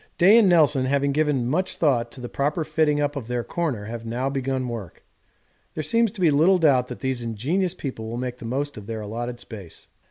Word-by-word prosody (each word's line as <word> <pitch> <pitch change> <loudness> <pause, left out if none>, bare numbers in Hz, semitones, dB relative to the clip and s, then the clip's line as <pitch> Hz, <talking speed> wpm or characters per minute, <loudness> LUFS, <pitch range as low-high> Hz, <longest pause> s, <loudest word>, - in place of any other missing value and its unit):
Day 200 +6 +7
and 205 -5 +5
Nelson, 150 -6 +4
having 140 +1 +1
given 145 -4 +1
much 185 +8 0
thought 120 -7 +1
to - - -11
the 120 - -5
proper 145 +6 -1
fitting 155 -1 +1
up 145 0 0
of 130 -6 -5
their 120 -1 -2
corner, 140 -12 -3
have 115 +1 -6
now 120 +4 -2
begun 135 -1 -2
work. 115 -8 -7 0.7
There 155 - -2
seems 230 +4 +2
to 195 - -8
be 165 -4 +5
little 165 +7 +4
doubt 135 -7 +3
that - - -8
these 130 -2 -1
ingenious 140 - -1
people 115 -5 -6
will 115 - -4
make 125 0 -4
the 120 - -10
most 140 +4 -3
of 105 -1 -9
their 110 -1 -4
allotted 120 +3 -5
space. 100 -8 -11
135 Hz, 220 wpm, -24 LUFS, 120-155 Hz, 0.7 s, Day